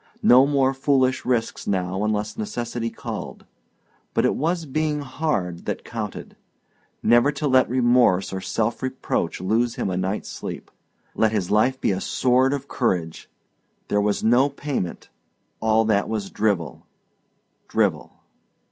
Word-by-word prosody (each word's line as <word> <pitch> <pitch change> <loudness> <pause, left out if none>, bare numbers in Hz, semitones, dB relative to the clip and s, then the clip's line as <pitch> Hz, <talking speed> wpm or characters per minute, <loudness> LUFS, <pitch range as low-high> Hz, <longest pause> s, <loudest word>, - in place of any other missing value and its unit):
No 130 +3 +7
more 135 -2 +2
foolish 135 -1 +1
risks 120 -3 -1
now 95 0 -1
unless 105 0 -1
necessity 115 +1 -3
called - - -7 0.7
but - - +3
it - - +3
was 165 +3 -1
being 150 +1 -1
hard 130 - -2
that - - -4
counted - - -6 0.7
Never 120 +4 +5
to 145 +1 -2
let 130 -1 +4
remorse 120 -7 +3
or 95 - -3
self 110 +4 -1
reproach 130 0 -2
lose 115 +6 0
him 95 - -2
a 90 - -2
night's 95 +3 -2
sleep - - -7 0.4
let 110 -1 +2
his 100 -4 -1
life 125 +5 +3
be - - +1
a 95 0 -2
sword 130 +1 +2
of 140 -1 -3
courage 90 -12 -2 0.6
there 105 - +2
was 105 0 0
no 125 +5 +4
payment 140 - -4 0.5
all 110 0 +2
that 105 -2 +1
was 105 -3 -3
drivel 95 - -1 0.8
drivel. - - 0
115 Hz, 140 wpm, -23 LUFS, 100-130 Hz, 0.8 s, No